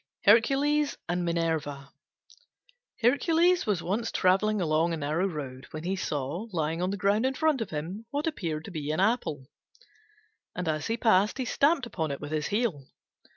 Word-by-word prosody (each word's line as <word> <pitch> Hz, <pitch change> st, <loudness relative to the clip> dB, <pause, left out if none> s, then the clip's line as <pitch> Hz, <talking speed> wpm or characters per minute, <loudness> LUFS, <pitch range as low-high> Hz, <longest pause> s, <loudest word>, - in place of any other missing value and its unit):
HERCULES 275 Hz, +7 st, +3 dB
AND 175 Hz, +1 st, -1 dB
MINERVA 160 Hz, -5 st, -2 dB, 1.1 s
Hercules 330 Hz, +7 st, +3 dB
was 195 Hz, -5 st, 0 dB
once 220 Hz, +6 st, -1 dB
travelling 205 Hz, +3 st, +2 dB
along 165 Hz, 0 st, +1 dB
a -, -, -2 dB
narrow 155 Hz, +5 st, 0 dB
road 135 Hz, -6 st, -6 dB
when 155 Hz, 0 st, -7 dB
he 185 Hz, +3 st, -1 dB
saw 155 Hz, -, -3 dB
lying 165 Hz, -1 st, -1 dB
on 180 Hz, -, 0 dB
the 200 Hz, -, -2 dB
ground 200 Hz, +4 st, +2 dB
in 265 Hz, +1 st, 0 dB
front 310 Hz, -4 st, +1 dB
of 215 Hz, -, -3 dB
him 180 Hz, +8 st, -5 dB
what 290 Hz, +3 st, -2 dB
appeared 165 Hz, -, -3 dB
to -, -, -8 dB
be 150 Hz, -4 st, -4 dB
an 155 Hz, -, -1 dB
apple, 195 Hz, -, 0 dB, 1.1 s
and 180 Hz, -1 st, -3 dB
as 155 Hz, -1 st, -1 dB
he 230 Hz, -, -1 dB
passed 215 Hz, -3 st, +3 dB
he 260 Hz, -, -2 dB
stamped 285 Hz, +3 st, +2 dB
upon 165 Hz, -9 st, -3 dB
it 140 Hz, -, -4 dB
with 145 Hz, 0 st, -7 dB
his 155 Hz, -1 st, -1 dB
heel. 205 Hz, -, -1 dB
185 Hz, 175 wpm, -28 LUFS, 155-230 Hz, 1.1 s, HERCULES